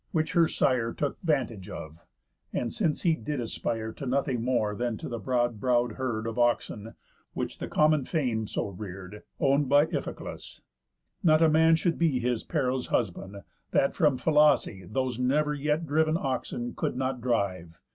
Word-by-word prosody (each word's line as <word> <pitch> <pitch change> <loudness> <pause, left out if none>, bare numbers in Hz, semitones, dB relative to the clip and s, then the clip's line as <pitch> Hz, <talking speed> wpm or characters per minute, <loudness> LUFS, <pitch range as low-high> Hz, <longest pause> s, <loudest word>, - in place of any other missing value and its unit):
Which 160 -5 0
her 170 -1 +4
sire 120 -6 +1
Took 145 - -3
vantage 125 - -1
of, 80 +2 -8 0.5
and, 120 - -2
since 165 -8 0
he 170 - +4
did 145 0 -4
aspire 115 -1 -3
To 140 - -7
nothing 130 -2 0
more 120 -4 +1
than 120 +1 -2
to - - -7
the 120 -1 -4
broad 120 0 0
brow'd 120 0 +2
herd 115 -2 -3
Of 115 +1 -3
oxen, 115 -2 0 0.4
which - - -4
the - - -4
common 150 -3 +3
fame 120 -9 -1
so - - -2
rear'd, 95 +1 -8 0.2
Own'd 140 -1 +2
by 145 +2 +6
Iphiclus, - - -6 0.6
not 160 -4 +5
a 160 - +6
man 160 +1 +5
should 165 +1 0
be 160 -6 +2
His 125 -2 0
Pero's 130 -5 -1
husband, 100 -2 -2 0.3
that 135 - +2
from 150 -6 +2
Phylace 145 - +2
Those 130 0 -1
never 150 +4 +2
yet 150 +3 -1
driv'n 155 +2 +2
oxen 130 -4 -3
could - - -2
not 130 -1 -2
drive. 95 -9 -1
125 Hz, 165 wpm, -28 LUFS, 115-150 Hz, 0.6 s, by